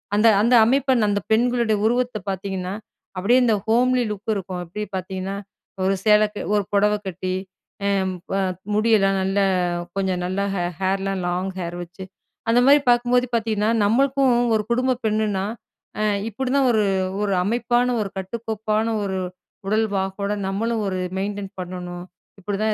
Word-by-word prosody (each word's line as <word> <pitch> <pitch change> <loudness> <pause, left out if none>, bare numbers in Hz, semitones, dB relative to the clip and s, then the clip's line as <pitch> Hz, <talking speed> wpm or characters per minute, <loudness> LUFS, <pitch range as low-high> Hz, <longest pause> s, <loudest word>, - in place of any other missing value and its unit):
அந்த 210 +2 +4
அந்த 235 +4 +3
அமைப்ப 265 +2 +2 0.2
அந்த 205 0 0
பெண்களுடைய 235 -1 +2
உருவத்த 245 -1 0
பாத்தீங்கன்னா, 190 0 -4 0.4
அப்பிடியே 235 +7 +4
இந்த 230 - +3
ஹோம்லி 250 +2 +3
லுக் 210 +2 -4
இருக்கும். 185 -2 -4
எப்பிடி 210 +5 -5
பாத்தீங்கன்னா, 190 +1 -4 0.5
ஒரு 195 +1 +2
சேலைக்கு 210 0 +3
ஒரு 205 - +2
புடவ 210 +1 +4
கட்டி 185 0 -3 0.5
அ - - +2 0.4
ப - - -1 0.4
முடியெல்லாம் 210 -3 +3
நல்லா, 195 +1 +1 0.5
கொஞ்சம் 190 -2 0
நல்லா 185 +2 -1
ஹே 175 - -1 0.2
ஹேர்லாம் 195 0 0
லாங் 180 +2 -1
ஹேர் 170 -1 -4
வச்சு, 175 +2 -11 0.5
அந்த 235 - +5
மாரி 285 +1 +7
பாக்கும்போது 245 +1 +3
பாத்தீங்கன்னா, 220 -2 0 0.2
நம்மளுக்கும் 270 +4 +3 0.2
ஒரு 215 - +1
குடும்ப 255 +2 +2
பெண்ணுனா, 210 -3 0 0.6
அ - - +1 0.3
இப்பிடிதான் 265 +4 +1
ஒரு, 215 -2 +2 0.4
ஒரு 205 -1 0
அமைப்பான, 240 +3 +1
ஒரு 200 - -3
கட்டுக்கோப்பான 220 +2 -2 0.2
ஒரு 190 -1 -2 0.5
உடல் 220 +2 +2
வாகோட, 195 +1 -2 0.2
நம்மளும் 220 +3 -1
ஒரு 185 - -2 0.2
மெயின்டெயின் 200 0 -4
பண்ணணும், 180 0 -6 0.4
இப்பிடிதான் 210 +3 -1
210 Hz, 140 wpm, -22 LUFS, 190-230 Hz, 0.6 s, மாரி